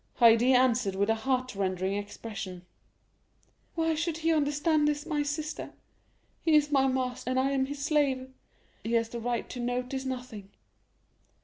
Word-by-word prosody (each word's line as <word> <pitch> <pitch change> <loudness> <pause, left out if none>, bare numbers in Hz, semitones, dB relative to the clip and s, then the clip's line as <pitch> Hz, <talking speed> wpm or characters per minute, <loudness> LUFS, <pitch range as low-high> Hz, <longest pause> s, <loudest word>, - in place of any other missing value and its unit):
Haydée 235 +2 +6
answered 245 -5 +3
with 200 +3 +2
a - - +4
heartrending 200 -6 -1
expression, 200 -2 -6 1.1
"Why 325 -1 +1
should 325 +1 -2
he 330 0 +1
understand 295 +1 +2
this, 295 0 -1
my 300 -3 -1
sister? 300 +2 -4 0.7
He 320 -2 +4
is 295 -1 +3
my 270 -2 +4
master, 255 -1 -2
and 255 0 +1
I 270 +1 +1
am 265 -1 +1
his 285 0 -5
slave; 275 -4 +1 0.5
he 230 - -3
has 230 -1 +2
the 235 - -5
right 240 0 -2
to 250 - -6
notice 250 +2 -2
nothing." 245 -6 -6
255 Hz, 150 wpm, -29 LUFS, 230-290 Hz, 1.1 s, Haydée